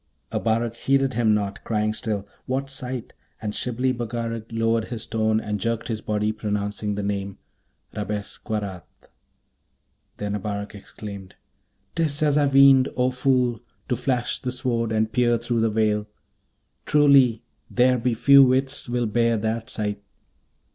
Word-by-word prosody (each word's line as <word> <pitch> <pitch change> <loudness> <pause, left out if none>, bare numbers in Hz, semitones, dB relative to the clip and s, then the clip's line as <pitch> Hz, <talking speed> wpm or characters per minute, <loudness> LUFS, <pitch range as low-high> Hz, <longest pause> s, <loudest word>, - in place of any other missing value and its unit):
Abarak 115 +1 0
heeded 135 0 +1
him 110 -2 +3
not, 100 -1 -3
crying 110 -1 0
still, 105 -2 -3 0.2
'What 135 +1 -2
sight?' 130 -3 -4 0.3
and 105 -1 -4
Shibli 125 +3 -1
Bagarag 115 -2 -4
lowered 115 0 +1
his 115 -3 -5
tone, 110 -1 +1
and 105 -1 -3
jerked 115 +3 -2
his 110 -2 -2
body, 105 0 0
pronouncing 105 -1 -3
the 100 - -3
name 100 -1 -3 0.6
'Rabesqurat!' 105 -2 -4 1.4
Then 105 0 -3
Abarak 100 0 -4
exclaimed, 100 -1 -9 0.6
''Tis 155 -2 0
as 145 -2 +3
I 145 -1 +4
weened. 135 -1 +6
Oh, 125 0 +2
fool! 125 -2 +1 0.3
to 125 - +2
flash 125 0 -1
the 125 - -2
Sword 120 -3 -1
and 110 0 +1
peer 120 -2 +3
through 120 0 -1
the 115 0 +2
veil! 105 -1 +1 0.8
Truly, 140 -6 +5 0.3
there 125 0 +3
be 120 0 0
few 140 +4 +7
wits 130 0 +1
will 120 0 0
bear 115 +1 +2
that 110 +1 -2
sight!' 105 -1 -2
115 Hz, 140 wpm, -24 LUFS, 105-125 Hz, 1.4 s, few